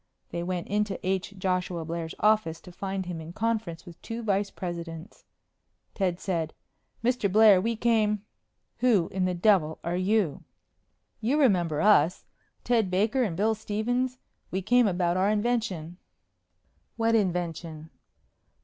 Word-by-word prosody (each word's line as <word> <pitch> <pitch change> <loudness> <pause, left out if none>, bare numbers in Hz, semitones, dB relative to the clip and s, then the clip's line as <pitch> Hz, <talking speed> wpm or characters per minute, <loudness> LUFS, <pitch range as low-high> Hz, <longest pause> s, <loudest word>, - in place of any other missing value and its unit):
They 170 - -3
went 175 0 -3
into 210 -1 -1
H. 190 +1 -1
Joshua 180 -3 -1
Blair's 165 0 -4
office 210 -7 +2
to 180 - -12
find 195 +1 -4
him 175 -2 -5
in 160 +2 -9
conference 215 -6 -2
with 175 -2 -13
two 230 0 -6
vice 200 -1 +1
presidents. 170 0 -7 0.7
Ted 185 -3 -1
said, 165 -4 -2 0.5
"Mr. 240 -5 +1
Blair, 210 -2 +7
we 230 +3 -1
came 215 -3 +1 0.3
" - - -50
"Who 220 -9 +3
in 185 -1 -1
the 180 -1 0
devil 175 -4 +3
are 170 +1 -2
you?" 185 -4 +1 0.8
"You 255 +7 +1
remember 175 - +2
us. 180 -5 +4 0.4
Ted 225 -5 +2
Baker 210 +8 +1
and 190 -9 -1
Bill 215 +3 +2
Stephens. 240 +4 -2 0.3
We 190 +1 -3
came 245 +3 +4
about 175 -2 +1
our 190 +2 +2
invention." 210 -7 -1 1.0
"What 230 0 +1
invention?" 170 -6 -2
190 Hz, 140 wpm, -27 LUFS, 175-220 Hz, 1.0 s, Blair